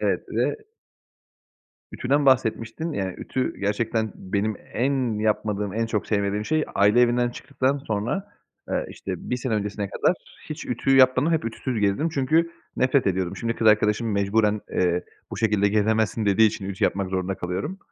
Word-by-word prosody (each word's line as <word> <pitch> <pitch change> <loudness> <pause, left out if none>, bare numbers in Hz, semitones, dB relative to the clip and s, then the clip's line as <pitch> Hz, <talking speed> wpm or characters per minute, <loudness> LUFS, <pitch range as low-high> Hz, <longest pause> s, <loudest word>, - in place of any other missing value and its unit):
Evet. - - 0
Ve - - 0 1.4
Ütüden 140 +2 +1
bahsetmiştin. 130 +5 +1
Yani, 95 -6 -2
ütü 130 - -2
gerçekten 110 +2 -1
benim 100 +3 -2 0.2
en 125 -3 0
yapmadığım, 105 -2 -1
en 115 0 0
çok 105 -3 -2
sevmediğim 100 0 0
şey. 155 +7 +1
Aile 105 +4 +4
evinden 120 0 +3
çıktıktan 135 +2 -1
sonra, 125 - -3 0.4
ııı, - - -1
işte, - - -6
1 125 - +1
sene 120 -2 -2
öncesine 100 -1 -2
kadar 175 - +1 0.3
hiç 155 - -6
ütü 135 +2 +1
yapmadım. 130 +4 +5
Hep 160 -1 +1
ütüsüz 115 0 -3
gezdim 105 +11 +1
çünkü 160 +3 +1 0.3
nefret 130 -1 +2
ediyordum. 95 -2 -1
Şimdi 115 0 -2
kız 110 - 0
arkadaşım 110 +1 +3
mecburen, 105 +1 +2
eee, 90 -1 +1 0.3
"Bu - - -5
şekilde 105 -2 +2
gezemezsin." 110 +1 +1
dediği 110 +3 +5
için 105 -2 -3
ütü 95 - -1
yapmak 95 -1 0
zorunda 95 0 -1
kalıyorum. 95 - -4
110 Hz, 155 wpm, -24 LUFS, 100-130 Hz, 1.4 s, yapmadım